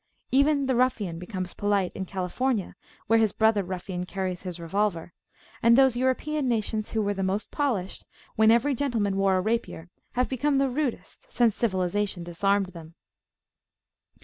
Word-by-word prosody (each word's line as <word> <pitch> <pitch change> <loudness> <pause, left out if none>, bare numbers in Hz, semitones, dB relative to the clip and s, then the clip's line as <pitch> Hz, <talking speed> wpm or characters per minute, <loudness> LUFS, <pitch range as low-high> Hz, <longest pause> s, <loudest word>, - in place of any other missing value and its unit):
Even 280 +1 +3
the 260 - +1
ruffian 225 -9 0
becomes 185 0 -5
polite 200 -3 0
in 190 - -4
California, 195 +4 -2 0.3
where 225 +1 +4
his 220 -2 +3
brother 220 0 +3
ruffian 180 0 -5
carries 185 -2 -3
his 180 -2 -7
revolver, 170 0 -1 0.5
and 235 +1 +5
those 265 -2 +5
European 260 +3 0
nations 220 -1 -1
who 220 -1 -1
were 205 0 0
most 195 +2 -2
polished 235 -11 -2 0.3
when 220 0 +5
every 235 +5 +4
gentleman 230 -7 0
wore 195 -1 +2
a - - +1
rapier, 185 -5 -3 0.2
have 250 0 +1
become 275 +2 0
the 275 0 +2
rudest 300 - -4
since 235 - +2
Civilisation 190 -3 -1
disarmed 195 +3 0
them. 165 -1 -11
210 Hz, 150 wpm, -26 LUFS, 185-250 Hz, 0.5 s, and